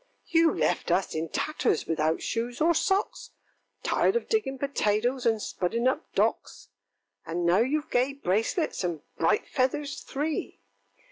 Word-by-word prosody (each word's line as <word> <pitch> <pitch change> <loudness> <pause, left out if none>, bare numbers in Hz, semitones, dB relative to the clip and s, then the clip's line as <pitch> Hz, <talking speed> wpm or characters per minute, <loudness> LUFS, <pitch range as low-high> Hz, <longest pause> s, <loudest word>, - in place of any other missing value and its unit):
ŌĆöŌĆ£You 330 0 +4
left - - 0
us 195 - +1
in 160 +1 -3
tatters, 305 - 0
without 160 0 0
shoes 235 +1 -2
or 335 +2 +4
socks, 390 +5 0 0.5
Tired 395 - +2
of 470 - -1
digging 415 -12 0
potatoes, 245 -2 0
and 225 -1 +2
spudding 225 +5 -1
up 260 - -1
docks; - - -1 0.5
And 170 +1 -3
now 175 +5 +4
youŌĆÖve 295 +5 -1
gay 255 +3 +2
bracelets 225 - -1
and 170 -4 -2 0.2
bright 190 +6 +2
feathers 280 +3 -1
three! 300 +3 -3
250 Hz, 140 wpm, -27 LUFS, 190-300 Hz, 0.5 s, ŌĆöŌĆ£You